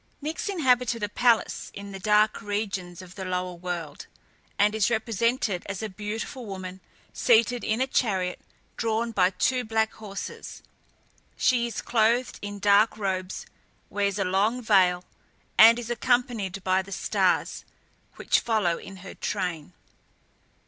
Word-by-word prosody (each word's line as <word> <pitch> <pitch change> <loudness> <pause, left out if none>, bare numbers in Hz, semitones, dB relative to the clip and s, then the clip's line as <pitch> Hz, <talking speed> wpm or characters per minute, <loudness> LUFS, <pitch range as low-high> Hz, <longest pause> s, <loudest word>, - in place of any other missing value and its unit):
Nyx 310 +7 -4
inhabited 250 - +1
a 205 - -1
palace 235 +1 +1
in 200 0 -8
the 195 - -7
dark 210 +2 +3
regions 195 -4 -4
of 180 -1 -13
the 190 - -7
lower 180 -1 -2
world, 175 -3 -6 0.5
and 205 +1 +3
is 220 -1 +2
represented 225 -3 0
as 195 +1 -4
a 220 - -3
beautiful 215 +6 -5
woman, 190 -1 -7 0.3
seated 235 0 +3
in 220 +2 0
a 260 - +3
chariot, 190 -9 0 0.4
drawn 230 0 0
by 185 -4 +3
two 250 +6 0
black 220 -1 0
horses. 200 -2 -8 0.7
She 240 -2 +2
is 235 - -5
clothed 235 +2 +1
in 205 0 -5
dark 205 +2 +4
robes, 190 -2 -3 0.5
wears 200 -1 0
a - - 0
long 200 +6 +1
veil, 185 -6 +3 0.5
and 230 +1 +8
is 240 -1 -5
accompanied 235 -6 0
by 185 0 +2
the 195 +1 -13
stars, - - 0 0.5
which - - +2
follow 210 -7 0
in 195 - -10
her - - -8
train. 180 -5 -3
210 Hz, 140 wpm, -26 LUFS, 190-230 Hz, 0.7 s, and